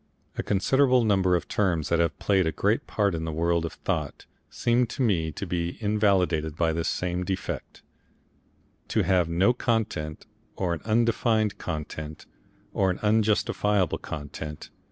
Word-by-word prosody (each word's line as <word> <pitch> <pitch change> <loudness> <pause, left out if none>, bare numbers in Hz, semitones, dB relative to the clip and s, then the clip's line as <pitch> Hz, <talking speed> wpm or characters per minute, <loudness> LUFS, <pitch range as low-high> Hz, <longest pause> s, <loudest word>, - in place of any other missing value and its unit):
A - - -1
considerable 130 +5 +3
number 95 -4 +3
of 85 - -2
terms 85 -7 0
that 85 - +2
have 85 -1 +1
played 95 -4 +2
a - - +1
great 105 +6 0
part 100 -3 +1
in 80 -1 -3
the 80 - -3
world 85 +1 +1
of 85 - -5
thought, 75 -7 -3 0.2
seem 120 +1 +1
to 130 +3 -2
me 85 -9 +1
to 100 - -5
be 85 -1 -2
invalidated 95 -8 +1
by 80 -1 +1
this 80 0 -1
same 90 0 -1
defect, 95 +1 -5 1.0
to - - +1
have 90 -3 +2
no 95 +8 +3
content 105 -11 -2 0.3
or 90 -3 -1
an 85 - -5
undefined 110 -1 +1
content 75 -1 -6 0.5
or 95 - +2
an 90 - -1
unjustifiable 105 -3 +2
content. 75 -1 -7
90 Hz, 155 wpm, -26 LUFS, 80-105 Hz, 1.0 s, considerable